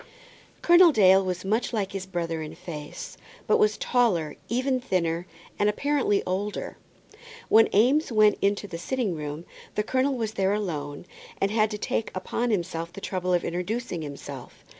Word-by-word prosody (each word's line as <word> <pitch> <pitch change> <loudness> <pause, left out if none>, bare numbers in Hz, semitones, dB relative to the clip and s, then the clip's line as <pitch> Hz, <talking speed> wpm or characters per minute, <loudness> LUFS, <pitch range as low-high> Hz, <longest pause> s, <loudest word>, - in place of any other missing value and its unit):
Colonel 345 0 +7
Dale 195 -6 +5
was 185 0 -3
much 220 +5 0
like 200 -4 -1
his 195 -1 -5
brother 170 -3 -3
in 155 - -7
face, 150 -4 -8 0.3
but 450 - +3
was 430 0 +3
taller, 235 - +1
even 255 +2 +1
thinner, 175 -7 -1 0.3
and 205 - +3
apparently 270 -3 +1
older. 200 +3 -3 0.7
When 225 0 +6
Eames 260 +8 +3
went 215 -2 +4
into 200 +1 +1
the 170 -4 -7
sitting 235 +1 -1
room, 150 +1 -6 0.3
the 210 - +1
colonel 260 +4 +1
was 220 -2 -2
there 195 -1 +1
alone, 155 -8 -4 0.3
and 195 - +1
had 215 -1 +2
to 210 - -4
take 220 +1 -2
upon 230 +6 -2
himself 170 -5 -2
the 180 - -9
trouble 185 -2 -2
of 175 -1 +2
introducing 180 +2 -3
himself. 140 -3 -9
195 Hz, 160 wpm, -26 LUFS, 175-230 Hz, 0.7 s, Colonel